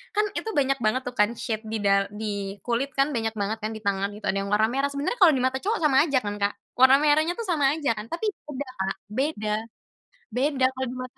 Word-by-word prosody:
kan 420 +1 +3
itu - - -4
banyak 275 -1 +2
banget 230 +3 +1
tuh 250 - -4
kan 210 - +5
shade 220 0 -3
di 220 0 -2
da 195 0 +3
di 200 -1 -4
kulit 255 +3 -1
kan 275 +2 +2
banyak 225 -4 -2
banget 215 +2 -2
kan 215 +1 -3
di 220 - -9
tangan 200 0 0
gitu 210 - -9
ada 195 - -3
yang 195 - -3
warna 215 +1 +4
merah 275 +2 +1
sebenarnya 285 +12 -3
kalau 340 -6 +7
di 255 - 0
mata 260 +1 +1
cowok 435 +7 -1
sama 275 -3 +4
aja 275 -4 +2
kan 205 0 -3
Kak 200 0 0 0.2
warna 260 +1 +8
merahnya 310 +3 +3
tuh 465 - -4
sama 295 -6 +2
aja 295 -6 0
kan 210 +1 -6
tapi 415 - -2 0.2
beda 285 -1 -5
Kak, 190 0 -1 0.2
beda, 215 -4 -1 0.8
beda 265 +3 +1
kalau 260 0 -2
di - - -7
mata 255 0 -9
255 Hz, 240 wpm, -25 LUFS, 210-285 Hz, 0.8 s, warna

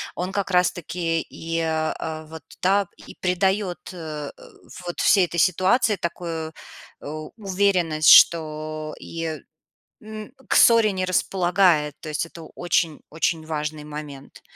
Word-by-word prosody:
он 180 +1 -3
как 200 -1 -2
раз 180 0 +4
таки 165 -1 -2
и, 165 +1 -5
э, 160 0 -2
вот, 160 -2 -10 0.2
да, 195 +1 +3
и - - -13
придаёт, 190 +1 0
э, 155 -4 -6 0.5
вот 175 - -5
всей 195 -4 +5
этой 170 0 -4
ситуации 190 +6 +3
такую 165 -2 -4 0.5
у 155 +1 -7
уверенность, 185 -6 +2
что 155 -1 +4
и 165 -2 -5 0.6
н 215 -1 -9 0.2
к - - +1
ссоре 230 -3 +6
не 185 -1 -2
располагает. 180 -4 +2
То 155 - -8
есть 150 +1 -1
это 165 0 -12
очень 170 -3 0
очень 160 0 -1
важный 150 -1 -4
момент. 150 -2 -9
165 Hz, 130 wpm, -23 LUFS, 155-185 Hz, 0.6 s, ссоре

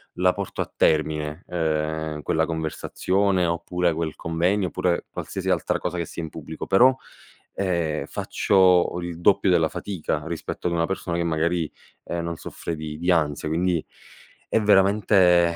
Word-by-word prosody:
la 90 0 +3
porto 100 -1 -6
a - - -4
termine, 75 +1 +1
uhm, 80 -2 -2
quella 80 0 +1
conversazione, 90 +4 0
oppure 85 +1 0
quel 80 -1 -3
convegno, 90 +4 0
oppure 85 0 -1
qualsiasi - - -5
altra - - +1
cosa 90 - -3
che 85 - -1
sia 85 - -7
in 80 - -5
pubblico, - - -7
però, 120 +7 +6 0.6
ehm, 85 -5 -1
faccio 90 -2 +2
il 85 -1 -6
doppio 100 +1 +4
della 85 -3 +3
fatica 80 -6 -3
rispetto 85 +1 -4
ad 85 - -1
una 85 -1 +1
persona 95 -2 -3
che 85 - 0
magari, 85 0 0 0.3
ehm, 85 - -3
non 85 0 -3
soffre 85 +1 -6
di 75 -1 -6
di 85 +3 +1
ansia. 75 -4 +1
Quindi, 85 +1 0 0.7
è - - +3
veramente 95 -4 +4
85 Hz, 155 wpm, -24 LUFS, 80-90 Hz, 0.7 s, però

